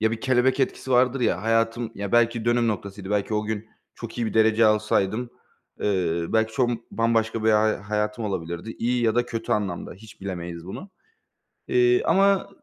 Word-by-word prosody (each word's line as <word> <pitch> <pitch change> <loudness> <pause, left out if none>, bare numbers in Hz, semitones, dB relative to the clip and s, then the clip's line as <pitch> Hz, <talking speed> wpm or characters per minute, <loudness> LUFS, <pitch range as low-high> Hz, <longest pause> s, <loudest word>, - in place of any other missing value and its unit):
Ya, 110 +1 +2
bir 115 0 -4
kelebek 130 +1 +2
etkisi 130 0 -2
vardır 125 +1 +3
ya. 105 -6 0
Hayatım 115 +1 0
ya, 100 -1 -5
belki 120 -1 +2
dönüm 120 0 +2
noktasıydı, 100 -2 -5
belki 105 +1 0
o 105 - 0
gün 110 0 -4 0.3
çok 115 0 -8
iyi 120 - 0
bir - - -4
derece 110 0 +4
alsaydım, 105 +2 +1 0.5
eee, 85 -4 0
belki 110 0 +1
çok 125 0 +1 0.2
bambaşka 115 -1 0
bir 110 - +5
ha 110 -1 +2
hayatım 105 +1 -1
olabilirdi. 85 0 -4
İyi 120 +1 0
ya 110 -1 +2
da 120 0 +1
kötü 115 -2 -3
anlamda, 95 -5 -2
hiç 110 +3 -16
bilemeyiz 85 -3 -6
bunu. 185 - -8 0.8
Eee, 370 0 +3
ama 195 0 +3
110 Hz, 175 wpm, -24 LUFS, 105-120 Hz, 0.8 s, bir